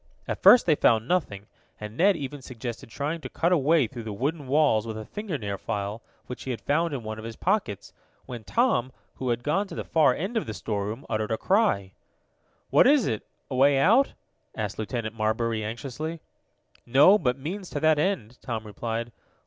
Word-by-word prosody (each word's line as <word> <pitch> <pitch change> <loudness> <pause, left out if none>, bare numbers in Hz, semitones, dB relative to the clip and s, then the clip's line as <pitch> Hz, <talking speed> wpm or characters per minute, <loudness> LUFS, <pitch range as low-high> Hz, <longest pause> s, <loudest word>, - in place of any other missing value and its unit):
At - - -4
first 245 - +8
they 160 - +4
found 115 -5 +3
nothing, 120 - -1 0.3
and 105 +1 -7
Ned 190 +5 +4
even 145 -1 -6
suggested 120 -2 -7
trying 150 +7 -3
to - - -7
cut 170 +2 0
a 180 - +5
way 150 0 +3
through 120 +1 -7
the 110 -1 -6
wooden 145 +6 -2
walls 135 -6 +3
with 110 -1 -5
a 110 - -6
fingernail 140 - -4
file, 105 +2 -4 0.2
which 125 - -8
he 130 -2 -3
found 165 +7 0
in 125 - -5
one 110 0 -5
of - - -9
his 115 0 -7
pockets, 185 - -1 0.3
when 120 -3 -8
Tom, 175 - +1 0.3
who 130 - -3
had 120 0 -1
gone 195 +8 0
to - - -9
the - - -4
far 155 -6 +3
end 200 +8 -3
of 220 - -2
the 110 - -5
storeroom, 105 +4 -4
uttered 110 0 -2
a 110 - 0
cry. 185 - +1 0.8
"What - - +6
is 285 -3 +5
it 110 -4 -3 0.2
a - - -2
way 135 +2 +5
out?" 225 - +4 0.4
asked 105 -2 -4
Lieutenant 110 0 -3
Marbury 110 0 -1
anxiously. 135 +9 -5 0.6
"No, 145 - +6
but 125 -5 0
means 180 +7 -6
to 145 - -3
that 155 -1 +4
end," 150 - -2
Tom 115 -3 -4
replied. 115 +2 -4
130 Hz, 195 wpm, -26 LUFS, 110-160 Hz, 0.8 s, first